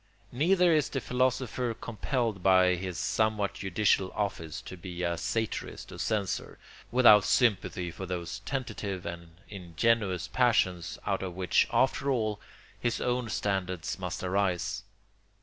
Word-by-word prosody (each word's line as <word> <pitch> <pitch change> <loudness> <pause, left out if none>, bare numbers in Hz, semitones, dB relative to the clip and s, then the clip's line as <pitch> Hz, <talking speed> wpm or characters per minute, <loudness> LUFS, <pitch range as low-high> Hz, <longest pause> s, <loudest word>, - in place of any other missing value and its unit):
Neither 175 +6 +3
is 155 -2 +2
the 135 - -2
philosopher 125 -2 0
compelled 115 -3 -2
by 95 -1 +5
his 90 -1 -4
somewhat 105 +2 0
judicial 95 0 +1
office 90 -7 -3
to - - -8
be 90 0 -6
a 85 0 0
satirist 110 +7 -3
or - - -9
censor, 105 -4 -2 0.3
without 115 -5 +7
sympathy 90 -4 +1
for 95 +3 -7
those 90 +3 -4
tentative 100 -5 -4
and 85 -1 -7
ingenuous 95 +1 0
passions 95 -9 +1
out 100 -2 0
of 90 -2 -5
which, 90 -2 +2
after 135 +1 +2
all, 110 -5 0 0.4
his 120 -1 -1
own 125 -1 -1
standards 95 -4 -2
must 90 +1 -4
arise. 95 +1 0
100 Hz, 130 wpm, -29 LUFS, 90-120 Hz, 0.4 s, without